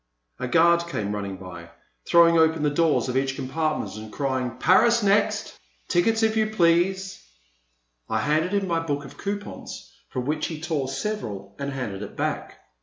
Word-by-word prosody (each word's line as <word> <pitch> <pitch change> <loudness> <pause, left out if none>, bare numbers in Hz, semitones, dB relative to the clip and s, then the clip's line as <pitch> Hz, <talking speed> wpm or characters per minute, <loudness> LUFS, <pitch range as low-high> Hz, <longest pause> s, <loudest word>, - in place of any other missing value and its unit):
A - - -2
guard 170 +4 +4
came 105 -11 -3
running 100 -2 -4
by, 85 -2 -10 0.4
throwing 170 0 +6
open 160 -1 +3
the 150 - +2
doors 160 -1 +2
of 125 - -3
each 135 0 0
compartment, 155 +2 -2
and 110 0 -9
crying, 130 -3 -2
Paris 235 - +4
next! 200 +1 +1 0.3
Tickets, 225 +6 +2
if 220 0 +2
you 220 -1 +2
please.*' 190 0 +1 0.9
I - - 0
handed 155 +4 +1
him 200 -1 +1
my 165 -2 +1
book 145 -3 -3
of 135 - -13
coupons 205 +1 -6 0.2
from 125 -1 -4
which 150 +2 -1
he 160 -2 -6
tore 155 -4 -2
several 115 - -4
and 140 0 -3
handed 115 -8 -4
it - - -8
back. - - -3
155 Hz, 170 wpm, -25 LUFS, 130-175 Hz, 0.9 s, throwing